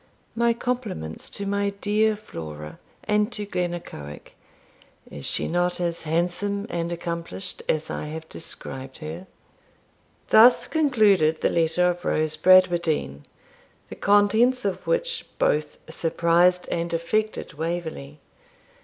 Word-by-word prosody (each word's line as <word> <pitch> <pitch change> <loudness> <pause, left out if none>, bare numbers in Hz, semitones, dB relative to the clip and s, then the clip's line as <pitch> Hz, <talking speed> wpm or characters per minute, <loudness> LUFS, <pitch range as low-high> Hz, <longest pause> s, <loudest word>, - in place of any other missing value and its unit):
My 235 0 +3
compliments 230 - -4
to 200 - -6
my 200 0 0
dear 215 +1 +2
Flora 75 - -9 0.2
and 210 +2 +1
to 210 - -4
Glennaquoich. 175 - -5 0.8
Is 70 - -7
she - - 0
not 175 +1 0
as 170 -1 -2
handsome 180 +5 -1
and 170 0 -2
accomplished 170 +2 -5
as 155 0 0
I - - -4
have 160 +1 -7
described 135 -5 -8
her? 165 +4 -7 1.0
Thus 235 +3 +7
concluded 210 - +3
the - - +2
letter 170 +2 +2
of 175 0 -8
Rose 155 -2 0
Bradwardine, 170 - +3 0.6
the - - -7
contents 220 +5 +3
of 195 -2 -2
which - - 0
both 150 0 +1
surprised 170 +2 +2
and 170 0 -2
affected 215 +6 -1
Waverley. 160 - -4
175 Hz, 120 wpm, -24 LUFS, 160-205 Hz, 1.0 s, Thus